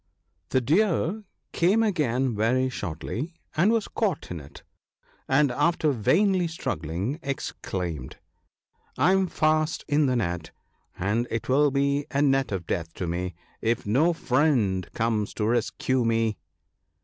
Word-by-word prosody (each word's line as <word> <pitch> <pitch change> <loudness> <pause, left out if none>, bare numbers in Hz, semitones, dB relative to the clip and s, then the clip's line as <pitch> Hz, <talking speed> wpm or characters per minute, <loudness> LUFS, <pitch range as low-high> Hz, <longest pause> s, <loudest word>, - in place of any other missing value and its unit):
The 130 - +2
Deer 190 - +1 0.3
came 195 +7 +3
again 135 - +1
very 125 +5 +2
shortly, 120 - -5 0.2
and 180 +8 +4
was 230 -3 +1
caught 200 - -2
in 85 - -4
it, 70 -1 -13 0.6
and 140 0 +3
(after 160 +3 +2
vainly 180 - +2
struggling) 95 - -3
exclaimed, 90 - -4 0.4
" - - -68 0.3
I 155 +8 +4
am 190 0 +3
fast 155 -1 +1
in 145 -1 +3
the 130 - +1
net, 85 -7 -2 0.5
and 110 +6 0
it 115 - -3
will 145 +3 +4
be 140 +1 0
a 140 - -1
net 135 -3 +2
of 95 -4 -3
death 85 0 -3
to 90 - -3
me 90 +1 -3 0.3
if 115 +2 0
no 135 +12 +3
friend 125 - +1
comes 110 -2 0
to 105 - -1
rescue 120 +2 +1
me 115 -1 +1
130 Hz, 140 wpm, -26 LUFS, 105-155 Hz, 0.6 s, and